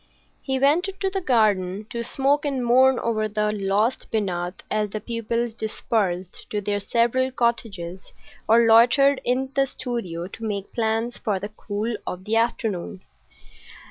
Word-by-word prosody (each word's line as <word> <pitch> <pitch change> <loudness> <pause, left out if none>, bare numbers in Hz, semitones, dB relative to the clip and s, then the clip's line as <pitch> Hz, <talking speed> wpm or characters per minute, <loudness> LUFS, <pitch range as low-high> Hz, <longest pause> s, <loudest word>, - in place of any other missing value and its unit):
He 265 -1 -1
went 295 +8 +3
into 390 0 -3
the 385 0 -2
garden 210 - +2
to 235 -1 -3
smoke 275 +4 +1
and 270 -4 -1
mourn 260 +2 +5
over 215 -2 0
the 210 0 0
lost 210 +4 0
Binat 180 -4 -2
as 210 -1 0
the 215 - -4
pupils 230 +1 -2
dispersed 200 -5 -2
to 210 - -1
their 205 0 -1
several 240 +5 +1
cottages 205 -8 -2 0.4
or 230 +1 +6
loitered 250 +5 +5
in 260 +2 0
the 275 0 +2
studio 230 -11 -4
to 225 +4 -10
make 205 -3 -4
plans 225 +1 -1
for 210 -4 -1
the 205 +2 -5
cool 215 +2 -4
of 185 +1 -5
the 220 - 0
afternoon. 215 -5 -1
225 Hz, 150 wpm, -24 LUFS, 205-245 Hz, 0.4 s, or